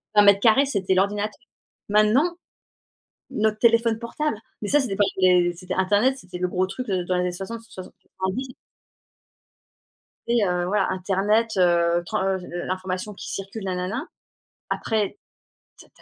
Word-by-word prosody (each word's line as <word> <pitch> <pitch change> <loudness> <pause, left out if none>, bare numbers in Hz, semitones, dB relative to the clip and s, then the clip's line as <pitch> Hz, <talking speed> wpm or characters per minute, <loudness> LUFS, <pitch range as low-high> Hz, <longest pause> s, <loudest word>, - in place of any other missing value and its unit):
vingt 210 - +7
mètres 200 -1 +6
carrés 235 +6 +5
c'était 195 -7 0
l'ordinateur. 205 +2 0 0.5
Maintenant, 225 +12 +3 0.9
notre 215 0 0
téléphone 230 -1 +3
portable, 235 +2 -2 0.2
mais 205 - -3
ça, 295 - +4
c'était 230 -8 -1
pas 205 - +4 0.2
des 180 -1 +4
c'était 180 +1 -6
internet, 205 +8 +2
c'était 180 -7 -9
le 180 0 0
gros 185 +1 0
truc, 250 +6 -6
heu, 185 -2 0
dans 185 - 0
les 180 - +1
années 180 0 -1
60-70-90. 195 +3 -6 1.7
Après, 235 - +1
heu, 180 -2 0
voilà, 200 0 +1
internet, 200 +4 +1
heu, 170 -1 +3
tre 215 - -2
heu, 190 -1 0 0.3
l'information 185 +2 -3
qui - - -8
circule, 195 +2 -6
nanana. 185 - -3 0.6
Après, 220 - -1 0.6
ta - - -15
200 Hz, 140 wpm, -24 LUFS, 185-225 Hz, 1.7 s, vingt